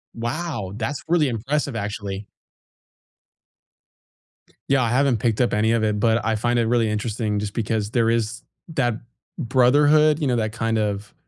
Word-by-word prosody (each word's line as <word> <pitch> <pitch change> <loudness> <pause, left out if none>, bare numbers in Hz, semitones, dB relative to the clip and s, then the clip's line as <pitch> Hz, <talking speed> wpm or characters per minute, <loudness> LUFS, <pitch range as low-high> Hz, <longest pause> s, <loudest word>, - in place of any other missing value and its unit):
Wow, 120 - -4
that's 130 +5 -3
really 165 -4 +3
impressive, 135 +3 -2
actually. 100 -1 -5 2.4
Yeah, 135 -1 +3
I 115 - 0
haven't 130 -1 +2
picked 115 +2 0
up 120 - +1
any 110 +2 +2
of 115 -1 +1
it, 105 -1 0
but 115 +1 +2
I 110 -1 +1
find 120 +2 0
it 115 - +1
really 115 -2 +2
interesting 105 0 -2
just 105 0 -4
because 110 -1 -2
there 115 -2 +2
is 115 -1 -1 0.3
that 120 -7 0 0.4
brotherhood, 145 +4 +4
you 145 - 0
know, 125 - +1
that 110 -2 -1
kind 115 -1 -1
of 105 -1 -2
115 Hz, 160 wpm, -22 LUFS, 110-130 Hz, 2.4 s, brotherhood